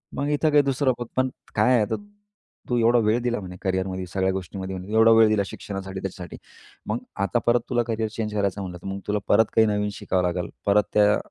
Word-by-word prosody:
"मग 145 - -1
इथं 150 +2 +2
काही 145 0 +6
दुसरं 135 -1 +1
बघ. 120 - -3
पण 130 0 +2 0.3
काय 130 - +4
आहे? 120 - +3
आता 105 - 0 0.7
तू 120 - +1
एवढा 120 +1 +4
वेळ 110 +3 +2
दिला 120 -1 -1
म्हणे 90 -2 -8
करिअरमध्ये, 95 0 -2
सगळ्या 95 +1 0
गोष्टींमध्ये, 95 0 -5
म्हणे 95 +3 -8
एवढा 110 +1 +6
वेळ 115 -1 +7
दिला 105 -2 +2
शिक्षणासाठी, 95 -1 -6
त्याच्यासाठी. 90 -3 -7 0.5
मग - - 0 0.3
आता 120 +5 +1
परत 120 0 +3
तुला 120 -1 +1
करियर 110 -1 -1
चेंज 105 -1 -4
करायचं 100 -1 -1
म्हणलं, 90 -2 -6
तर - - -8
मग 95 0 -4
तुला 105 0 0
परत 110 - +5
काही 110 0 +5
नवीन 105 0 0
शिकावं 90 -2 -1
लागेल, 90 0 -1 0.2
परत 105 +1 +4
त्या 105 0 +4
105 Hz, 220 wpm, -24 LUFS, 95-115 Hz, 0.7 s, वेळ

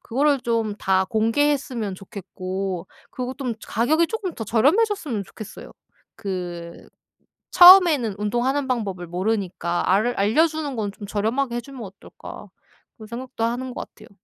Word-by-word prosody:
그거를 280 +3 +1
좀 230 -3 -1
다 190 0 +2
공개했으면 230 0 0
좋겠고 190 -2 -5 0.2
그리고 255 +1 -5
또 275 - -8
좀 235 - -1
가격이 310 +10 +2
쪼끔 405 -4 -4
더 225 - -5
저렴해졌으면 285 - +1
좋겠어요. 215 +2 -11 0.4
그 175 -4 -6 0.6
'처음에는 350 - +8
운동하는 250 +6 0
방법을 195 -8 -3
모르니까 180 -2 -2
알 200 +4 +3
알려 220 +12 +4
주는 310 -4 -4
건 210 -3 -2
좀 205 0 -10
저렴하게 235 +5 -1
해 240 - -2
주면 270 -1 -11
어떨까?' 195 -1 -11 0.5
그런 215 -2 -12
생각도 240 +1 -6
하는 245 +2 -2
것 - - -7
같아요. - - -17
230 Hz, 330 characters per minute, -23 LUFS, 195-275 Hz, 0.6 s, 처음에는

